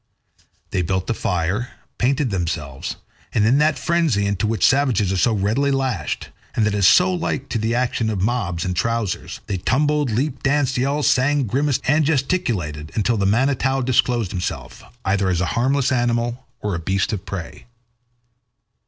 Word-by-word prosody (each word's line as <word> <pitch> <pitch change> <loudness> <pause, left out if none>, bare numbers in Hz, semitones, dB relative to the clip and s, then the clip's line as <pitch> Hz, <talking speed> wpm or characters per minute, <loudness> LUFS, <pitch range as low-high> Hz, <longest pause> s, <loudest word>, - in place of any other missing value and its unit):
They 90 - 0
built 95 +4 -1
a - - +2
fire, 100 +2 -2 0.3
painted 130 0 +1
themselves, 75 -7 -3 0.4
and 105 - +3
in 125 +6 +4
that 155 0 +3
frenzy 165 - +1
into 100 +1 0
which 110 0 +1
savages 130 -8 +2
are - - 0
so 90 +7 +3
readily 110 +7 +1
lashed, 130 - -2 0.3
and 110 - +2
that 105 - +1
is 100 -3 +4
so 180 - +5
like 165 -5 -3
to 115 - -1
the 110 +2 0
action 120 -2 0
of 105 -3 -2
mobs 95 -5 -1
in 90 - -1
trousers, 115 +1 -2
they 100 - -2
tumbled, 145 +7 +1
leaped, 130 +5 -1
danced, 135 -1 +1
yelled, 140 +3 0
sang, 140 +2 +3
grimaced, 135 +4 0
and 150 +3 +4
gesticulated 115 - -1
until 115 +2 +1
the 100 -2 +1
Manitou 135 +4 +1
disclosed 120 -4 +1
himself, 90 -2 -5 0.2
either 95 0 +1
as 90 -2 +1
a 90 - +1
harmless 130 +2 +1
animal 120 0 0
or 105 -1 -2
a 85 - -2
beast 95 +5 -1
of 100 -2 -3
prey. 95 0 -7
115 Hz, 170 wpm, -21 LUFS, 95-135 Hz, 0.4 s, so